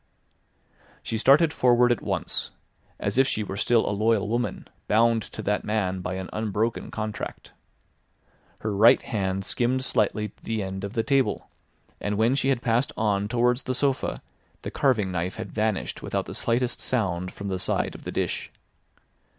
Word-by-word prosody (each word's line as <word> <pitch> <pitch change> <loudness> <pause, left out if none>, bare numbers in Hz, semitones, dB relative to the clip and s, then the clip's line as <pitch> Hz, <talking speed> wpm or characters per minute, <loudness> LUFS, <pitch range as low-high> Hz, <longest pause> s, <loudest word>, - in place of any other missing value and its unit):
She 110 - -2
started 145 +7 +5
forward 125 -1 +4
at 120 - +1
once, - - -2 0.5
as 100 +5 0
if 135 - +5
she 110 - 0
were 95 - -5
still 115 +3 +2
a - - +1
loyal 105 0 +2
woman 115 -2 -2 0.2
bound 115 +1 +4
to 110 - -8
that 105 +1 0
man 100 -4 -1
by 90 +1 -3
an 95 -1 -4
unbroken 110 +2 -1
contract. 110 -1 -5 1.1
Her 105 -1 -2
right 110 +4 +7
hand 95 -2 -2
skimmed 130 +4 0
slightly 105 -3 0
the 110 -2 -2
end 95 0 -5
of 100 +1 -4
the 115 - 0
table, 135 -1 +1 0.5
and 105 0 -2
when 115 +4 +3
she 135 0 +1
had 130 -3 +1
passed 120 +3 +1
on 105 -2 +1
towards 120 +2 +2
the 130 - -2
sofa 135 0 0 0.4
the - - -4
carving 110 -9 +2
knife 90 +1 -2
had - - -6
vanished 110 -2 -1
without - - -2
the - - -7
slightest 120 +1 0
sound 90 -7 -1
from 100 0 -6
the 95 -1 -2
side - - 0
of - - -11
the - - -5
dish. - - -2
110 Hz, 170 wpm, -26 LUFS, 100-120 Hz, 1.1 s, right